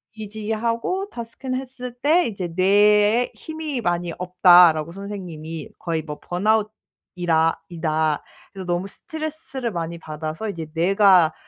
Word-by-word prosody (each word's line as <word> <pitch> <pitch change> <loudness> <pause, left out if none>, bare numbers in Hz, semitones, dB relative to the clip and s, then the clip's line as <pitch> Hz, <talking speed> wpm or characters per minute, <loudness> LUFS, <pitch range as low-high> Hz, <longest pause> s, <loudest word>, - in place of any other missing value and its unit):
EEG하고 225 - -2
DASS 230 -1 -8
큰 260 -1 -3
했을 255 -1 -6
때 325 +5 +4
이제 195 -5 -4
"뇌에 210 +4 +4
힘이 315 -5 -5
많이 175 -3 -1
없다."라고 175 -3 +5
선생님이 175 -5 -7
"거의 165 -2 -2
뭐 150 -1 -7
번아웃이라 180 -4 0
이다." 155 -3 0 0.3
그래서 190 -2 -8
너무 175 +2 -1
스트레스를 310 -2 -5
많이 170 -2 -4
받아서 155 +6 -5
이제 165 -5 -5
뇌가 185 -1 +5
195 Hz, 305 characters per minute, -22 LUFS, 170-230 Hz, 0.3 s, 없다."라고